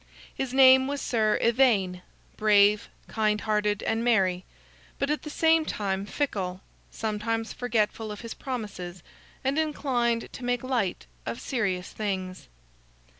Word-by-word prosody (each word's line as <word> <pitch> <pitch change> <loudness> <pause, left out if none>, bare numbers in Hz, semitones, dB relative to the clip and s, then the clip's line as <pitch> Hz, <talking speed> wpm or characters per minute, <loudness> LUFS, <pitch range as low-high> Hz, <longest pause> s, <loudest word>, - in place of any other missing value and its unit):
His 265 -2 -3
name 260 0 +7
was 285 0 -2
Sir 215 -5 +1
Ivaine; 220 -7 +3 0.3
brave, 210 -1 +4 0.2
kind 215 -1 +1
hearted, 210 -1 0
and 225 +1 0
merry; 190 -6 +2 0.5
but 280 +1 0
at 300 - -1
the 300 - -7
same 320 +1 +3
time 200 -7 -2
fickle, 190 -11 -2 0.3
sometimes 225 +1 -2
forgetful 225 -2 -1
of 210 - -7
his 230 -1 -6
promises, 195 - -6 0.4
and 275 +3 +1
inclined 250 -7 0
to 250 - -8
make 245 0 -1
light 235 - -1 0.2
of 115 - -3
serious 190 - -2
things. 190 -3 -4
220 Hz, 130 wpm, -27 LUFS, 200-255 Hz, 0.5 s, name